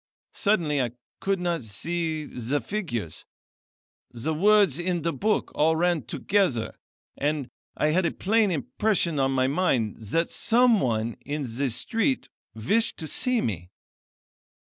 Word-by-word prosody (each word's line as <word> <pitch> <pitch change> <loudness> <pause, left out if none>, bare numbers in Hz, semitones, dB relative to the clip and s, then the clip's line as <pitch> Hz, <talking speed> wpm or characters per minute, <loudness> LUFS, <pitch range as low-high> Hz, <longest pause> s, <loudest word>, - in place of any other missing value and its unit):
Suddenly 165 -9 +1
I 120 -2 -2 0.3
could 195 -1 0
not 175 -3 -1
see 155 +8 -3
the 125 +2 -2
figures; 130 - -4 0.9
the 125 +6 -3
words 195 -2 +4
in 175 -1 -1
the 165 0 0
book 215 +1 0
all 160 +2 +3
ran 175 -1 +2
together, 150 - 0 0.4
and 145 -2 -1 0.3
I 150 - +2
had 170 +3 +2
a - - -1
plain 215 +1 +2
impression 170 - 0
on 135 0 +2
my 130 -1 +2
mind 130 - +1
that 140 +11 -1
some 235 -1 +4
one 115 -2 -1
in 145 +1 -3
the 130 +2 -2
street 230 - 0 0.3
wished 205 - 0
to 160 - -6
see 250 - +1
me. 90 -5 -3
160 Hz, 140 wpm, -26 LUFS, 130-195 Hz, 0.9 s, words